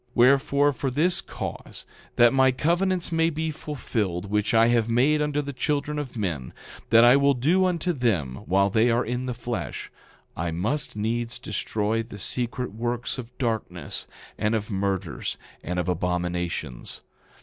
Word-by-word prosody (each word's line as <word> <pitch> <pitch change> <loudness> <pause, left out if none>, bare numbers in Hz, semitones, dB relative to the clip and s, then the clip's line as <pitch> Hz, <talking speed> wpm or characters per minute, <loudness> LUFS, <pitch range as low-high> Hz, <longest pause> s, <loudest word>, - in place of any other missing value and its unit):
10:15 125 - -44
Wherefore, 140 +3 +4
for 135 +1 -2
this 160 +7 +2
cause, - - -6 0.3
that 120 +1 +6
my 130 0 +5
covenants 175 +6 +1
may 165 0 +3
be 160 0 -2
fulfilled 105 - -3
which 105 0 +1
I 115 0 +5
have 115 -1 +2
made 140 +6 +3
unto 150 0 0
the 140 0 -5
children 150 +2 -1
of 130 -5 -6
men, 80 - -3 0.4
that 115 +1 +7
I 120 +2 +8
will 140 0 +4
do 165 +10 +3
unto 180 0 0
them 95 - 0
while 100 +2 +3
they 115 +3 +4
are 120 +2 +2
in 125 +2 -3
the 125 - -3
flesh, 120 0 -5 0.4
I 85 +1 -2
must 105 - -2
needs 115 +3 -2
destroy 105 +1 -1
the 115 -2 -9
secret 125 +2 -3
works 120 +3 -2
of 125 0 -9
darkness, 115 -5 -3 0.3
and 105 +2 +1
of 110 0 -3
murders, 95 -3 -2 0.3
and 90 - -3
of 90 -1 -1
abominations. 90 -5 -2
120 Hz, 160 wpm, -25 LUFS, 105-140 Hz, 0.4 s, I